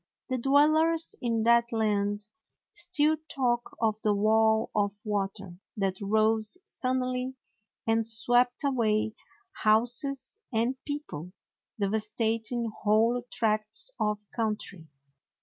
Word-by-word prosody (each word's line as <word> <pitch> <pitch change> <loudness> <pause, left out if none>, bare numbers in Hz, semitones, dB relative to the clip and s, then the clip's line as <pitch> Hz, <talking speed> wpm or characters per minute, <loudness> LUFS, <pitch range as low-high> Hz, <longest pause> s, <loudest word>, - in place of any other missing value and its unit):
The 255 -1 -1
dwellers 310 +5 +3
in 230 -3 0
that 235 +1 +4
land 205 -2 0 0.5
still 315 -3 +2
talk 240 -3 -1
of 220 -1 0
the 210 -1 +2
wall 220 +1 +3
of 205 -1 +1
water 195 -3 -3 0.2
that 195 -1 -1
rose 215 - +1
suddenly 255 -6 -2 0.5
and 225 0 +2
swept 245 +3 +2
away 220 -6 +1 0.4
houses 245 - +1
and 230 +2 +1
people, 185 - -6 0.4
devastating 220 +3 -1
whole 225 +3 +3
tracts 215 - +2
of 210 -1 -1
country. 210 -7 -3
225 Hz, 100 wpm, -28 LUFS, 210-250 Hz, 0.5 s, that